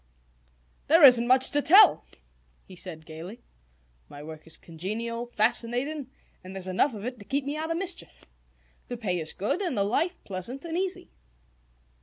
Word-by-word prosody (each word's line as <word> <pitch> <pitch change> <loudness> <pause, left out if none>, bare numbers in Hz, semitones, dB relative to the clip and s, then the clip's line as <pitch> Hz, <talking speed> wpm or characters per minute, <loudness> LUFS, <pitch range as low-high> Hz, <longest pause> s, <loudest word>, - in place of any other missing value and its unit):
"There 325 +2 +5
isn't 245 -3 +8
much 255 +1 +5
to 290 - +2
tell," 380 +9 +7 0.6
he 185 - -13
said 165 -3 -6
gaily. 165 +8 -10 0.7
"My 145 0 -11
work 155 +1 -11
is 165 - -7
congenial, 225 +8 -5
fascinating, 245 +5 0 0.3
and 185 +1 -10
there's 190 -1 -7
enough 220 +8 +1
of 205 +1 -8
it 250 -1 -6
to 205 - -12
keep 275 +3 -2
me 285 +1 -3
out 315 +1 -4
of 330 - -1
mischief. 375 0 -4 0.6
The 245 - -6
pay 185 -6 -2
is 160 -1 -2
good, 210 - -2
and 350 - -2
the 200 - +2
life 330 - -1
pleasant 205 - -6
and 330 -1 -5
easy." 375 +1 -3
235 Hz, 170 wpm, -27 LUFS, 185-290 Hz, 0.7 s, isn't